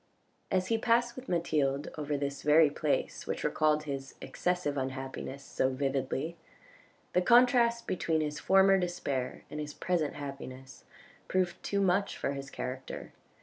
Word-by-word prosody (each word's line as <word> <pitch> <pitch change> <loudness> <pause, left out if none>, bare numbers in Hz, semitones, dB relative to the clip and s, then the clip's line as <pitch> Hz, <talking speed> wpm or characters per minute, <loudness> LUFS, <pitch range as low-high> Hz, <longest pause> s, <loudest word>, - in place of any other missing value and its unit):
As 185 -1 0
he 225 -1 +2
passed 240 +1 +2
with 255 0 -9
Mathilde 150 -5 0
over 150 -1 -2
this 140 0 -3
very 150 0 +5
place 150 0 -1
which - - -3
recalled 155 0 +2
his 135 -2 -5
excessive 180 -5 -1
unhappiness 135 0 -4
so 130 - 0
vividly, 135 +4 -2 0.8
the 180 - +4
contrast 235 +2 +5
between 160 -3 0
his 150 -1 -2
former 195 0 +5
despair 140 -8 -2
and 150 - -5
his 150 -1 -5
present 170 -5 0
happiness 135 -2 -8 0.4
proved 185 -2 0
too 200 0 0
much 195 +1 +1
for - - -1
his 140 0 -6
character. 130 0 -6
150 Hz, 145 wpm, -31 LUFS, 140-185 Hz, 0.8 s, very